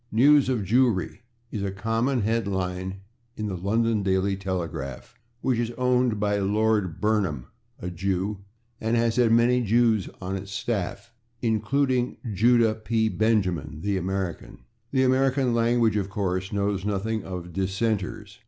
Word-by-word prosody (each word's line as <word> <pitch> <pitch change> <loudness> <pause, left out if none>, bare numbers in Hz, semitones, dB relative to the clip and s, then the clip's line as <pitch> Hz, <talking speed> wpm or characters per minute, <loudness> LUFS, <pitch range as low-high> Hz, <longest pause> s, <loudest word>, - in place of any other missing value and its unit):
"News 140 +4 +5
of 125 -4 +1
/Jewry/" 110 -2 +1 0.3
is 105 - -3
a 100 - -1
common 115 +6 0
head 115 0 0
line 95 0 -3 0.4
in 110 - -3
the 100 -3 -3
/London 110 +3 +1
Daily 95 +1 +1
Telegraph/, 85 - -5 0.3
which 125 -3 +1
is 120 -1 0
owned 125 -3 +2
by 105 0 +1
Lord 105 -3 +1
Burnham, 100 - 0 0.3
a 90 - -5
Jew, 95 +3 -2 0.4
and 115 +2 0
has 115 0 +1
had 120 -2 +4
many 120 +2 +4
Jews 115 -2 +2
on 95 +1 -4
its 95 0 -6
staff, 105 +1 -3 0.3
including 125 +3 +1 0.2
Judah 115 +2 +4
P. 110 0 0
Benjamin, 90 -10 0
the 100 0 0
American. 95 -2 -4 0.3
The 130 0 +2
American 130 -1 +2
language, 115 -1 +2
of 100 -1 -2
course, 95 -2 -2
knows 100 -2 -1
nothing 105 +2 -1
of 90 -2 -6
/dissenters 100 +2 -2
105 Hz, 145 wpm, -25 LUFS, 95-115 Hz, 0.4 s, News